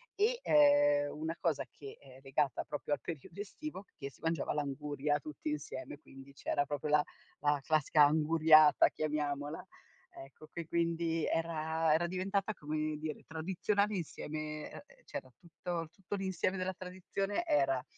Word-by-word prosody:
e, 445 +4 +2
ehm, 290 -2 +5
una 160 +2 -3
cosa 155 -5 +1
che, 140 -2 -10
ehm, 130 -2 -15
è - - -15
legata 135 0 0
proprio 145 0 -3
al - - 0
periodo 165 +3 -7
estivo, 205 +1 -6
che 140 -2 -6
si - - -22
mangiava 165 -2 0
l'anguria 145 0 -1
tutti 150 +1 -6
insieme. 145 -1 -5
Quindi 135 -2 -14
c'era 145 +1 0
proprio 145 +1 -3
la 150 0 +5 0.4
la 145 0 +3
classica 155 0 +4
anguriata 155 0 +6
chiamiamola, 150 0 -2 0.6
ecco 140 +3 -15
che 170 -2 -5
quindi 165 -1 0
era 160 -1 0
era 165 +2 +3
diventata 195 +3 -1
come 155 -2 -2
dire, 155 0 -5
tradizionale 190 +6 0
insieme 155 -3 -5
uhm, - - -9 0.2
c'era - - -6
tutto 170 -1 -5
tutto 195 +2 -6
l'insieme 190 0 -1
della 185 0 -1
tradizione 185 +2 -3
era: 135 -3 +2
155 Hz, 145 wpm, -34 LUFS, 150-185 Hz, 0.6 s, anguriata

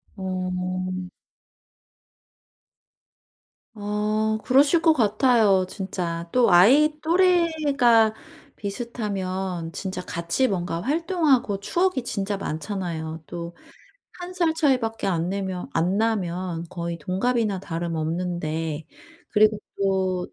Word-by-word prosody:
어. 185 -1 -3 2.7
아 215 +1 -1
그러실 285 +6 +4
것 325 -1 +5
같아요, 215 -5 +3
진짜. 175 -4 -4
또 250 -1 +4
아이 265 +13 +6
또래가 310 -10 +3 0.4
비슷하면 190 -5 -4
진짜 190 +1 -5
같이 170 +11 0
뭔가 175 -4 -2
활동하고 285 - +1
추억이 345 - 0
진짜 200 -3 -2
많잖아요. 160 -2 -4
또 170 0 -6 0.7
1 360 +1 -7
살 340 -3 +2
차이밖에 250 -9 +1
안 170 -2 0
내면 190 -2 -3
안 175 +4 +1
나면 180 -6 -1
거의 170 -1 -5
동갑이나 200 +3 0
다름없는데 165 -2 -3 0.4
그리고 215 0 +4 0.2
또 190 -2 0
195 Hz, 200 characters per minute, -24 LUFS, 175-240 Hz, 2.7 s, 아이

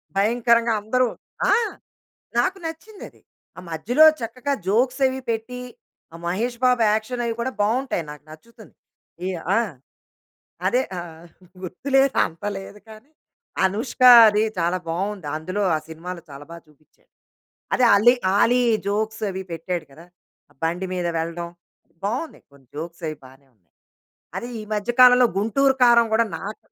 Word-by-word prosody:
భయంకరంగా 235 +2 +2
అందరూ 250 +4 +1 0.4
ఆ! - - +6 0.9
నాకు 380 +1 +1
నచ్చిందది. 350 +6 -10 0.4
ఆ - - -6
మధ్యలో 240 - +3 0.2
చక్కగా 250 +5 -3
జోక్స్ 250 +7 +1
అవి 260 0 -2
పెట్టి, 230 +2 -3 0.5
ఆ - - -9
మహేష్ 225 +8 -2
బాబు 250 -2 +3
యాక్షన్ 230 +3 -2
అవి 230 -1 -2
కూడా 260 +2 -2
బావుంటాయి 225 - 0
నాకు 150 0 -11
నచ్చుతుంది. 220 +7 -16 0.5
ఈ - - -1 0.3
ఆ! - - +5 1.1
అదే 245 +7 +2 0.2
ఆహ్, 165 -1 -9 0.4
గుర్తు 185 +9 -7
లేదు 270 0 +3
అంత 165 +4 -13
లేదు 195 +2 -11
కానీ 220 +6 -14 0.5
అనుష్క 220 +7 -2 0.3
అది 210 0 +2 0.2
చాలా 175 +2 0
బావుంది. 190 0 -3
అందులో 185 +6 -3
ఆ - - -1
సినిమాలో 170 +2 -7
చాలా 140 +1 -10
బాగా 170 0 -10
చూపిచ్చాడు. 150 0 -29 0.7
అదే 255 - +3
ఆల్లీ 225 +5 +6 0.2
ఆలీ 245 +4 +4 0.3
జోక్స్ 215 +2 -2
అవి 190 0 -5
పెట్టాడు 165 0 -4
కదా! 165 +5 -15 0.4
ఆ - - -23
బండి 175 +3 -1
మీద 180 -1 -2
వెళ్ళడం, 170 +1 -4 0.6
బావున్నాయి. 255 +10 -4
కొన్ని 140 -2 -21
జోక్స్ 170 +3 -7
అవి 155 - -5
బానే 135 +2 -17
ఉన్నాయి. 90 -7 -44 0.6
అది 240 - -5
ఈ - - -7
మధ్య 210 +3 -2
కాలంలో 250 0 +8
'గుంటూరు 265 +7 +2
కారం' 235 -1 +5
గూడా 230 0 +3
నాకు 210 +2 -8
210 Hz, 145 wpm, -22 LUFS, 170-245 Hz, 1.1 s, కాలంలో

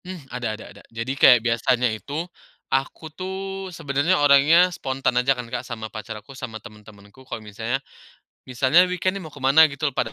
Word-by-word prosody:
Ada 125 -11 -5
ada 110 - -11
ada. - - -15
Jadi, 115 +3 -4
kayak 130 -3 +7
biasanya 120 0 +1
itu, 145 +9 -5 0.5
aku 135 +4 -2
tuh, 190 +1 -5
sebenarnya 160 +1 0
orangnya 150 +5 +5
spontan 135 -6 -2
aja 135 +1 +1
kan 125 - -5
Kak, 120 +2 -4
sama 110 -3 -8
pacar 110 0 -7
aku, 105 +6 -13
sama 115 -4 -7
teman-temanku 105 +1 -15
kalau 110 - -6
misalnya 110 +4 -3 0.7
misalnya 130 +8 +4
weekend 185 +1 -1
nih 195 - -6
mau 155 - -10
kemana, 140 +3 +5
gitu 150 +1 -1
loh, 140 - -9
pada, 115 -2 -1
135 Hz, 180 wpm, -23 LUFS, 115-160 Hz, 0.7 s, kayak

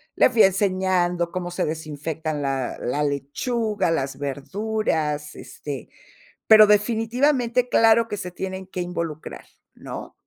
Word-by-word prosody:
le - - +5
fui 235 -3 +5
enseñando 185 -3 +1
cómo 180 -1 -4
se 175 - -1
desinfectan 155 0 -4
la 135 -2 -2
la 145 +4 -1
lechuga, 190 - -1
las 135 -4 -2
verduras, 150 0 -2
este, 140 -5 -8 0.6
pero, 215 -1 +9
definitivamente, 235 +4 +2
claro 225 0 +5
que 210 -2 -4
se 180 -2 -6
tienen 190 +1 -6
que 185 -1 -5
involucrar, 170 -3 -5 0.3
¿no? - - -8
180 Hz, 125 wpm, -23 LUFS, 150-215 Hz, 0.6 s, pero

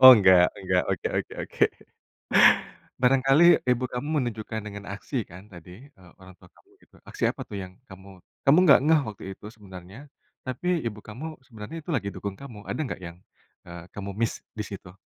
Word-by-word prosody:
oh, 130 0 +13
enggak 95 -3 +6
enggak, 90 -1 +1
oke - - -1
oke - - -5
oke. - - -6 1.4
Barangkali 135 +5 +4 0.2
ibu 125 0 +2
kamu 125 +4 -4 0.2
menunjukkan 110 -2 -4
dengan 100 -1 -8
aksi 100 +8 -7
kan 90 +2 -11
tadi, 90 - -12
eee, 95 -9 -19
orang 95 -1 -14
tua 90 - -17
kamu, - - -27
gitu, - - -23
aksi - - -10
apa - - -7
tuh 100 - -7
yang 90 - -9 0.2
kamu 95 0 -13 0.3
kamu 140 +5 +7
gak 140 - +8
ngeh 160 -1 +5
waktu 105 - -8
itu 105 - -13
sebenarnya, 95 0 -12 0.5
tapi 130 +7 -4 0.2
ibu 105 -2 -4
kamu 120 +9 -7 0.2
sebenarnya 115 +8 -8
itu 165 - -7
lagi 100 - -1
dukung 100 +1 -5
kamu, 115 -7 -10
ada - - -3
enggak 130 - -5
yang, 85 0 -8 0.5
eee, 85 0 -9
kamu 100 0 -5
miss 115 0 -1 0.2
disitu? 100 -3 -7
105 Hz, 180 wpm, -26 LUFS, 95-125 Hz, 1.4 s, oh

